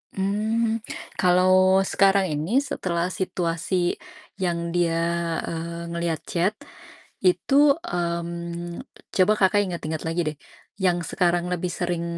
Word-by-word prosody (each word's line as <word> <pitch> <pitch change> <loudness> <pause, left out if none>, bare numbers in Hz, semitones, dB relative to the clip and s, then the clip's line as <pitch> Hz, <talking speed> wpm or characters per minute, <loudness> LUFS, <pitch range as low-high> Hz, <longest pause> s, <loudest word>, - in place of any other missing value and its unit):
Mmm, 220 +4 0 0.4
kalau 185 +1 +5
sekarang 195 -2 +3
ini 170 - +1
setelah 180 -9 -2
situasi 175 -1 -1 0.4
yang 170 -2 -1
dia, 170 -1 +1 0.5
eee, 170 +1 -5
ngeliat 170 -2 -1
chat. 180 +4 0 0.7
Itu, 275 +11 +4
mmm, 170 - -4 0.3
coba 190 +3 +5
Kakak, 195 +1 +4
ingat-ingat 160 -4 -4
lagi 165 +2 0
deh 150 - -14 0.4
yang 180 -2 +2
sekarang 175 +1 +1
lebih 180 0 -2
sering 175 -1 -2
175 Hz, 110 wpm, -24 LUFS, 170-190 Hz, 0.7 s, kalau